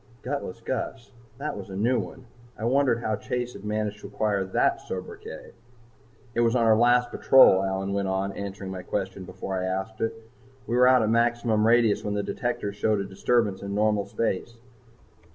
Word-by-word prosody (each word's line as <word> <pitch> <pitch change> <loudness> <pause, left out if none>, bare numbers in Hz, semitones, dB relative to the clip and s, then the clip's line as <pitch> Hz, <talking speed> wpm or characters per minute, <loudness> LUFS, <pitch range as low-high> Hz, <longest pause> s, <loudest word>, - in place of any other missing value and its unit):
Gutless 125 -5 -4
Gus! 125 0 -4 0.3
that 145 +3 -4
was 100 -1 -8
a 95 - -7
new 120 +5 +2
one. 115 +7 -7 0.3
I 110 - -4
wondered 130 -1 +2
how 110 - 0
Chase 125 0 -3
had 100 - -11
managed 105 0 -2
to - - -9
acquire 105 -3 0
that 95 - +1
sobriquet. 90 -1 -8 0.8
"It 115 - -1
was 115 0 +3
on 115 -2 +3
our 110 -1 +6
last 120 +2 +3
patrol," 130 -8 +6
Allyn 95 0 -2
went 100 -1 -1
on, 95 +1 -1
answering 100 -1 -6
my 95 -1 -5
question 95 0 -4
before 95 +1 -4
I 90 - -2
asked 95 +4 -3
it. 115 - -1 0.5
"We 120 - -2
were 125 0 +6
out 130 -2 +5
at 110 - +1
maximum 115 -2 +2
radius 115 -2 +3
when 105 0 -2
the 100 - -1
detectors 105 -4 -3
showed 105 0 +1
a - - -1
disturbance 100 +1 0
in 100 0 -4
normal 105 -1 +1
space. 115 +1 -2
110 Hz, 190 wpm, -26 LUFS, 100-120 Hz, 0.8 s, our